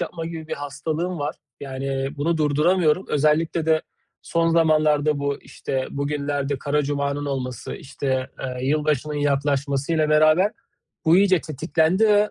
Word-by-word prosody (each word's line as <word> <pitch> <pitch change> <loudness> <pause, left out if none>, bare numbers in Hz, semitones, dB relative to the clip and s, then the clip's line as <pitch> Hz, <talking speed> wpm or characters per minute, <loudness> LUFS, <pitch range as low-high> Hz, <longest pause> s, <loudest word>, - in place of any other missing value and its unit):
yapma 165 -2 -4
gibi 165 -1 -7
bir - - -2
hastalığım 155 +5 -3
var. 145 +1 -2 0.3
Yani 135 0 -3
bunu 160 +4 0
durduramıyorum. 155 +3 +2
Özellikle 155 +2 +1
de 160 -1 +3 0.4
son 165 0 +1
zamanlarda 155 -2 +3
bu, 140 0 -1
işte, 130 -1 -4
bugünlerde 140 -1 -2
Kara 145 +3 0
Cuma'nın 140 0 -2
olması, 130 -3 -4
işte, 130 -2 -3
ııı, 125 -1 -4
yılbaşının 150 +1 0
yaklaşmasıyla 145 +2 0
beraber 155 +7 +4 0.5
bu 165 +1 +5
iyice 190 -2 +4
tetiklendi 160 +6 +1
ve, 210 0 +4
150 Hz, 130 wpm, -23 LUFS, 140-160 Hz, 0.5 s, bu